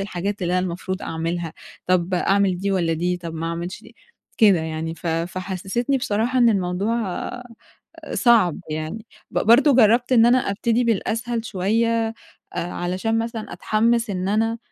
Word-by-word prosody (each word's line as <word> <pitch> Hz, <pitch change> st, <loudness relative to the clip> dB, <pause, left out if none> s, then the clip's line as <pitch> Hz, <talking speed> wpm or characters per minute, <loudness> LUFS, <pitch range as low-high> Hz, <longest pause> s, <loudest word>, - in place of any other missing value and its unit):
الحاجات 195 Hz, +1 st, -3 dB
اللي 175 Hz, 0 st, 0 dB
أنا 185 Hz, -, 0 dB
المفروض 185 Hz, +2 st, -4 dB
أعملها. 165 Hz, 0 st, -3 dB, 0.3 s
طب 180 Hz, 0 st, +1 dB
أعمل 195 Hz, 0 st, +2 dB
دي 200 Hz, +2 st, -1 dB
والّا 175 Hz, -4 st, +1 dB
دي؟ 175 Hz, +2 st, -1 dB
طب 170 Hz, -2 st, -7 dB
ما 165 Hz, +1 st, -3 dB
أعملش 170 Hz, +5 st, -5 dB
دي 230 Hz, +1 st, -16 dB, 0.4 s
كده 205 Hz, -5 st, +6 dB
يعني. 160 Hz, 0 st, -4 dB
ف 170 Hz, -, -9 dB
فحسّستني 185 Hz, +9 st, -2 dB
بصراحة 235 Hz, +3 st, 0 dB
إن 240 Hz, -1 st, +6 dB
الموضوع 195 Hz, +2 st, 0 dB, 0.2 s
أ 245 Hz, -, -6 dB, 0.7 s
صعب 220 Hz, -, +3 dB
يعني. 155 Hz, +9 st, -5 dB, 0.2 s
ب -, -, -1 dB
برضه 260 Hz, +5 st, +5 dB
جرّبت 240 Hz, +2 st, +4 dB
إن 230 Hz, -1 st, +6 dB
أنا 245 Hz, +2 st, +5 dB
أبتدي 230 Hz, +4 st, +1 dB
بالأسهل 230 Hz, +1 st, -1 dB
شوية 225 Hz, +3 st, 0 dB, 0.5 s
أ -, -, -3 dB
علشان 185 Hz, +6 st, -2 dB
مثلًا 230 Hz, -3 st, -4 dB
أتحمِّس 225 Hz, +4 st, +1 dB
إن 185 Hz, 0 st, -2 dB
أنا 225 Hz, +2 st, +1 dB
200 Hz, 155 wpm, -22 LUFS, 175-230 Hz, 0.7 s, كده